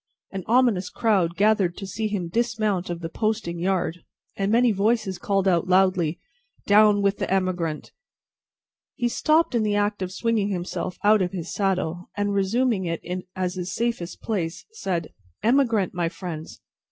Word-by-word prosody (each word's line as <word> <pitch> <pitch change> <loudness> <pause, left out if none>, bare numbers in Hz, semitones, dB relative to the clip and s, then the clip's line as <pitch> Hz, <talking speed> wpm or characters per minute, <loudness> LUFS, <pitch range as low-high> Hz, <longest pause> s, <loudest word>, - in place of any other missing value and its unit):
An 195 -2 -5
ominous 225 -6 +3
crowd 190 -7 +1
gathered 200 -3 +2
to 200 - -6
see 215 +3 -2
him 200 -5 -2
dismount 215 -2 0
of 175 0 -4
the 165 - -3
posting 215 -3 -2
yard, 180 -2 0 0.4
and 195 +1 0
many 235 +1 +4
voices 205 -1 0
called 195 -1 0
out 175 -1 +2
loudly, 185 -3 +2 0.5
"Down 205 0 +5
with 200 0 +1
the - - -2
emigrant!" 180 -5 -1 1.0
He 240 -3 0
stopped 310 +6 +2
in 235 - +2
the 210 -1 +1
act 205 0 0
of 185 -1 -3
swinging 215 +1 0
himself 180 -1 -3
out 210 0 +5
of 180 0 -1
his 175 -2 -5
saddle, 180 -3 -1
and, 205 0 0
resuming 200 +1 +1
it 165 -1 -3 0.3
as 185 -1 -1
his 185 0 -4
safest 230 -7 -3
place, 180 -5 -3
said: 180 - -3 0.3
"Emigrant, 230 -5 +2
my 175 -2 0
friends! 165 -3 -7
195 Hz, 160 wpm, -24 LUFS, 180-215 Hz, 1.0 s, Down